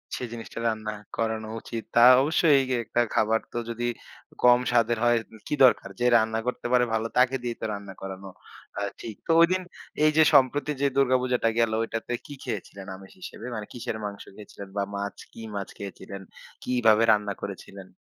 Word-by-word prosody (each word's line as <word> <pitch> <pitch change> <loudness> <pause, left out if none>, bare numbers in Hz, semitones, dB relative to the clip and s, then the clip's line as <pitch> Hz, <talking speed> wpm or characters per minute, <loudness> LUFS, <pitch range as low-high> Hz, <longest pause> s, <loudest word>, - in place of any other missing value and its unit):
সে - - -6
জিনিসটা 115 0 -8
রান্না 110 -1 -2 0.3
করানো 110 -1 -2
উচিত। 115 -1 -6
তা - - +6 0.2
অবশ্যই 150 -1 +4
এ - - +1
একটা 120 - +1
খাবার 110 +1 +3
তো - - -5
যদি 120 +1 -2 0.6
কম 125 0 +7
স্বাদের 120 -1 +2
হয় 120 0 +4 0.2
উ - - -12
কি 150 - -1
দরকার? 120 - +3
যে 120 - +1
রান্না 110 0 0
করতে 125 - -2
পারে 125 -1 +4
ভালো, 110 +1 0
তাকে 130 +1 +4
দিয়েই 120 -1 -3
তো - - -2
রান্না 100 -1 -7
করানো 95 0 -7 0.5
অ্যা 100 0 -2 0.2
ঠিক। 110 -3 -7
তো - - +2
ঐদিন 185 +2 +4 0.4
এইযে 155 +1 +5
সম্প্রতি 145 +2 +4
যে 140 - +4
দুর্গাপূজাটা 125 -3 +2
গেল 115 -1 +3
ঐটাতে 115 +1 -4
কি 145 - -9
খেয়েছিলেন 100 -4 -6
আমিষ 95 0 -14
হিসেবে? 115 - -9
মানে 105 -1 -5
কিসের 115 -2 -5
মাংস 100 -1 -6
খেয়েছিলেন 100 -2 -11
বা 100 - +1
মাছ 100 0 -4 0.2
কি 115 - -10
মাছ 100 - -3
খেয়েছিলেন, 100 0 -8 0.4
কিভাবে 115 -3 +3
রান্না 105 -1 +1
করেছিলেন? 100 -1 -8
115 Hz, 180 wpm, -26 LUFS, 105-125 Hz, 0.6 s, কম